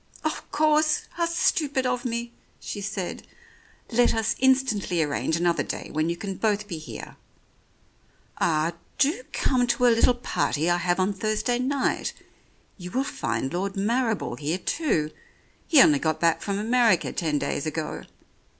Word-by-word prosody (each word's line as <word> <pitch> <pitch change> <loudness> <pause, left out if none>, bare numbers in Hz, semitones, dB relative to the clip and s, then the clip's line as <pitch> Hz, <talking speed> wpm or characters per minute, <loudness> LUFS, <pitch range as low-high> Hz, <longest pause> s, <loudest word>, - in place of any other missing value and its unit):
"Of 310 - -3
course! 305 0 +3
How 340 -1 -1
stupid 295 -5 +1
of 250 0 -1
me," 235 0 -3 0.3
she 205 - -6
said. 195 -3 -4 0.7
"Let 240 0 +3
us 225 0 0
instantly 250 -10 +2
arrange 150 +2 -1
another 170 0 +1
day - - -5
when 155 +2 0
you 170 - -2
can 195 +1 -5
both 210 -1 0
be 170 -5 -5
here. 155 - -9 1.2
Ah! 160 +1 +1 0.2
do 305 - +2
come 250 -2 +1
to 250 +1 +2
a 240 - +6
little 235 +2 +4
party 175 -8 0
I 175 - +3
have 175 +1 0
on 190 +2 +1
Thursday 215 +4 -1
night. 265 +1 0 0.7
You 180 0 -7
will 260 +7 0
find 135 - -3
Lord 195 +3 -2
Marrible 225 +1 0
here 155 +4 -1
too; 170 - 0 0.6
he 310 - +6
only 145 -2 +4
got 155 0 0
back 165 -1 +2
from 200 -1 -2
America 225 -3 +2
ten 155 -4 0
days 145 +1 -2
ago. 155 0 -4
210 Hz, 155 wpm, -25 LUFS, 170-250 Hz, 1.2 s, a